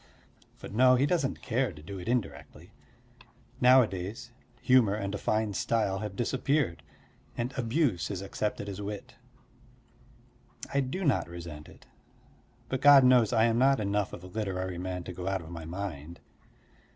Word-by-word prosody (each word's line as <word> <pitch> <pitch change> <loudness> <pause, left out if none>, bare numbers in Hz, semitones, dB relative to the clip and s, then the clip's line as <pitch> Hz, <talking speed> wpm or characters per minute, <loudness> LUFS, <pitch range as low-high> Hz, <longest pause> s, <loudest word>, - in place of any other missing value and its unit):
But - - -9
no, 130 +3 +5
he 130 +3 +2
doesn't 145 -3 -1
care 125 0 0
to 75 -3 -13
do 95 +4 -7
it 90 - -9
indirectly. 80 - -4 0.9
Nowadays 120 -2 +3 0.3
humour 120 -6 +4
and 100 -1 -4
a 100 - -3
fine 110 -1 0
style 100 -2 0
have 105 -2 -5
disappeared, 125 - 0 0.6
and 120 +3 -3
abuse 120 - 0
is 100 -2 -4
accepted 100 +1 -3
as 100 0 -6
wit. 105 0 -7 1.6
I 140 - +2
do 140 +8 -2
not 135 - +1
resent 85 -3 -9
it: - - -17 0.8
but 130 0 -3
God 140 -1 +8
knows 125 -4 +5
I 110 -2 +3
am 115 0 +2
not 135 +1 +4
enough 100 -1 -1
of 90 - -9
a - - -9
literary 95 -3 -4
man 90 0 -4
to 90 - -7
go 90 +1 -6
out 95 -1 -1
of 80 - -11
my 85 -2 -7
mind. 85 -2 -6
105 Hz, 160 wpm, -29 LUFS, 90-125 Hz, 1.6 s, God